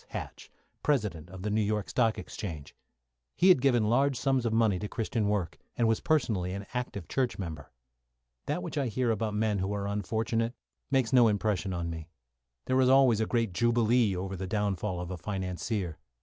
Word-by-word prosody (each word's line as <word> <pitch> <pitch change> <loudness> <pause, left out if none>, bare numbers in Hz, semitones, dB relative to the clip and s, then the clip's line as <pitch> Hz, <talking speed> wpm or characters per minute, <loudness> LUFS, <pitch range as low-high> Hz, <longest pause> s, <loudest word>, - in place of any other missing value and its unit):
Hatch, - - -7 0.3
President 105 - 0
of 95 0 -9
the 105 - -1
New 110 +1 +2
York 105 -1 -1
Stock 115 -3 +1
Exchange. 80 -5 -7 0.6
He 185 - +4
had 180 -9 +6
given 125 -4 +3
large 135 +3 +2
sums 135 -3 +1
of - - -1
money 110 -4 +2
to 105 - -3
Christian 110 -1 -1
work, 100 -6 -1 0.2
and 115 - +3
was 110 -1 +2
personally 105 - 0
an 100 +1 -5
active 125 -8 -4
church 130 -3 -1
member. 80 -6 -6 0.8
That 90 - -1
which 145 - -3
I 135 - 0
hear 120 +1 0
about 110 -1 -1
men 105 -1 +1
who 95 +2 -1
are 100 -1 -2
unfortunate 110 +3 -1 0.3
makes 130 -3 +1
no 120 -2 +7
impression 100 -2 0
on 85 -2 -3
me. 80 0 -7 0.6
There 130 0 +2
is 130 - +4
always 130 -4 +5
a 110 - 0
great 115 -5 0
jubilee 120 -1 +3
over 95 +2 -4
the 95 +1 -5
downfall 100 -2 -1
of 90 +1 -5
a 90 - -4
financier. 95 0 -3
105 Hz, 190 wpm, -29 LUFS, 95-120 Hz, 0.8 s, no